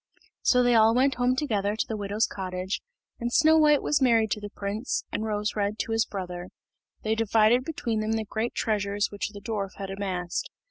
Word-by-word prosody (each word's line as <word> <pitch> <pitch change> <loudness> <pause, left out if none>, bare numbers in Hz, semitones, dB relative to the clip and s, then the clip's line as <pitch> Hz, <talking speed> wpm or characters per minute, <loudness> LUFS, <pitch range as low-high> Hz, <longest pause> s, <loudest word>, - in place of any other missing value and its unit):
So 250 -1 +4
they 245 0 +4
all 225 0 +5
went 265 +2 +3
home 250 0 +1
together 210 -7 0
to 220 - -1
the 220 - -3
widow's 205 +1 0
cottage, 185 0 -4 0.4
and 240 0 -2
Snow 315 +4 +5
white 300 -2 +4
was 290 - +1
married 230 -4 +3
to 210 - -1
the 205 - -6
prince, 205 +5 -3
and 220 - -2
Rose 210 -1 -1
red 205 0 -1
to 225 - -3
his 225 0 +2
brother. 180 -2 -5 0.6
They 220 - +1
divided 225 +2 +3
between 240 -7 -2
them 215 +1 -1
the 220 -1 -1
great 220 +3 -3
treasures 205 -1 0
which 205 0 -3
the 205 -1 -10
dwarf 200 -4 -4
had 195 -1 -6
amassed. 185 -3 -3
215 Hz, 200 wpm, -27 LUFS, 200-235 Hz, 0.6 s, all